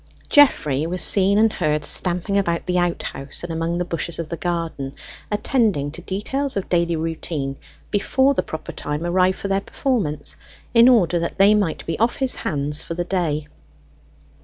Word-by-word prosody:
Geoffrey 155 - +4
was 180 -1 0
seen 200 +3 +3
and 220 0 +4
heard 150 -3 0
stamping 180 +5 +1
about 170 -4 0
the 180 0 +1
outhouse 170 -5 -3
and 170 -1 -4
among 165 +1 -1
the 180 - -1
bushes 170 0 -3
of 165 -2 -5
the 170 - -3
garden, 165 -6 -3 0.4
attending 210 - +1
to 165 - -9
details 235 +9 -2
of 195 - -3
daily 170 -1 +1
routine 160 -3 -3 0.4
before 265 +6 +2
the - - +1
proper 160 0 -7
time 150 +3 -4
arrived 185 +1 +2
for - - -4
their 195 0 +1
performance, 190 - -2 0.4
in 235 +1 +7
order 180 -8 +4
that 170 - -3
they 200 +2 +6
might 200 -6 0
be 165 - -3
off 230 +2 +2
his 265 -2 -1
hands 145 +1 -1
for 165 - -5
the 175 0 -2
day. 160 -5 -1
175 Hz, 175 wpm, -21 LUFS, 160-200 Hz, 0.4 s, in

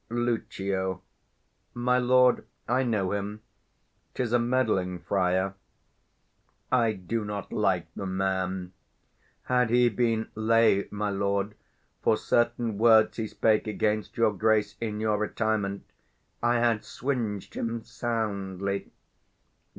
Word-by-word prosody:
Lucio. 100 -6 -2 0.7
My 125 +1 +2
lord, 125 0 +4 0.2
I 125 +2 +2
know 105 -7 0
him; 105 +1 -4 0.7
'tis 120 -2 -1
a 120 - +5
meddling 110 -7 +1
friar; 95 +2 0 1.2
I 120 -3 +3
do 105 +4 -3
not 105 -1 -5
like - - +1
the 100 - -4
man: 95 -1 -2 0.7
had 125 -2 +2
he 120 +1 +4
been 115 0 0
lay, 110 -2 +3
my 105 0 -2
lord, 100 +1 -1 0.5
For - - +3
certain 120 -2 0
words 110 -1 +5
he 110 -2 -2
spake 110 0 +1
against 105 0 -1
your 115 -2 +3
Grace 105 0 +1
In 105 -2 -3
your 110 -1 +1
retirement, 105 -2 -1 0.6
I 120 +1 +2
had 115 -2 +2
swinged 115 -7 -3
him 115 0 -3
soundly. 100 -5 -3
110 Hz, 115 wpm, -27 LUFS, 100-120 Hz, 1.2 s, a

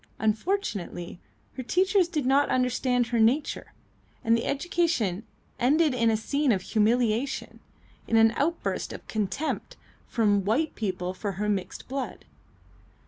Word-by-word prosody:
Unfortunately 215 - -2 0.3
her 260 - -5
teachers 370 - +2
did 305 -6 -2
not 275 +2 +3
understand 250 -1 +1
her 235 0 -1
nature, 245 +7 +1 0.5
and 230 0 +4
the 230 - -1
education 280 - 0 0.3
ended 295 +4 +3
in 230 -2 +2
a 220 - +2
scene 280 +5 +1
of 190 -4 0
humiliation, 230 +4 0 0.5
in 230 - +1
an 225 0 +6
outburst 305 +8 -2
of - - -10
contempt 215 +8 -3 0.3
from 205 -4 +2
white 275 +11 +1
people 185 -4 -3
for 200 +1 -4
her 210 +3 -2
mixed 200 -3 -3
blood. 270 0 -5
235 Hz, 135 wpm, -27 LUFS, 215-285 Hz, 0.5 s, an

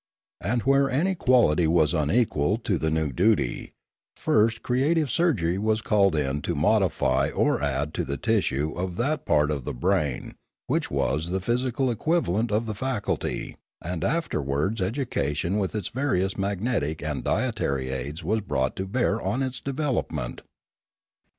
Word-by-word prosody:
And 115 +6 0
where 135 +1 +3
any 170 +9 +1
quality 120 - +3
was 80 -2 +3
unequal 80 +1 +1
to 105 -7 -1
the 80 - 0
new 80 -2 0
duty, 90 - +1 0.4
first 115 +2 +2
creative 140 +4 +1
surgery 100 - +1
was 110 +1 0
called 100 -5 +3
in 75 -1 -1
to - - -2
modify 75 -6 +2
or - - +1
add 70 +1 -1
to - - -1
the 70 - -3
tissue 70 +4 0
of 90 +1 -3
that 150 +6 -1
part 75 -1 +3
of 70 -3 -3
the - - -4
brain 75 -2 0 0.3
which - - -1
was 75 +6 0
the 95 +2 0
physical 125 +5 0
equivalent 115 - 0
of 110 +3 +1
the 110 - -3
faculty, 110 -1 -3 0.2
and 85 0 -4
afterwards 95 - -1
education 95 - -1
with 100 +1 -2
its 105 -4 -2
various 100 -8 0
magnetic 95 - -1
and 75 -2 -3
dietary 65 -1 -1
aids 70 +5 -5
was 110 +7 0
brought 65 -9 -1
to 95 - -3
bear 115 0 0
on 110 +8 -1
its 130 -1 -3
development. 130 - -2
95 Hz, 150 wpm, -26 LUFS, 75-120 Hz, 0.4 s, where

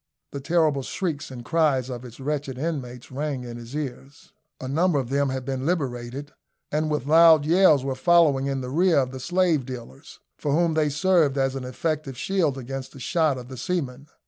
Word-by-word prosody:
The 140 - -5
terrible 155 -1 +2
shrieks 160 +1 -3
and 120 -3 -9
cries 150 -6 +2
of 125 -1 -6
its 120 0 -11
wretched 140 -1 -3
inmates 130 -6 -5
rang 140 -1 -3
in 120 -1 -7
his 120 +3 -9
ears. 140 0 -7 0.3
A - - -10
large 130 - -4
number 170 0 +2
of 125 -3 -4
them 140 0 +1
had 130 -1 -4
been 130 -1 -3
liberated, 140 -3 -3 0.4
and 155 +1 0
with 150 -4 -1
loud 160 0 +6
yells 160 -5 +5
were 135 - -1
following 145 -2 +3
in 135 -1 -2
the 125 0 -5
rear 170 +2 +3
of 130 -2 +1
the 130 - -7
slave 170 0 +1
dealers, 120 - -10 0.2
for 145 - -1
whom 165 +1 +2
they 155 -1 +2
served 150 -2 +2
as 135 -1 +1
an 130 -1 -5
effective 145 0 -3
shield 165 -5 0
against 135 +1 -6
the 135 - -11
shot 155 0 +1
of 125 -1 -8
the 130 0 -9
seamen. 140 -5 -3
140 Hz, 200 wpm, -24 LUFS, 130-160 Hz, 0.4 s, loud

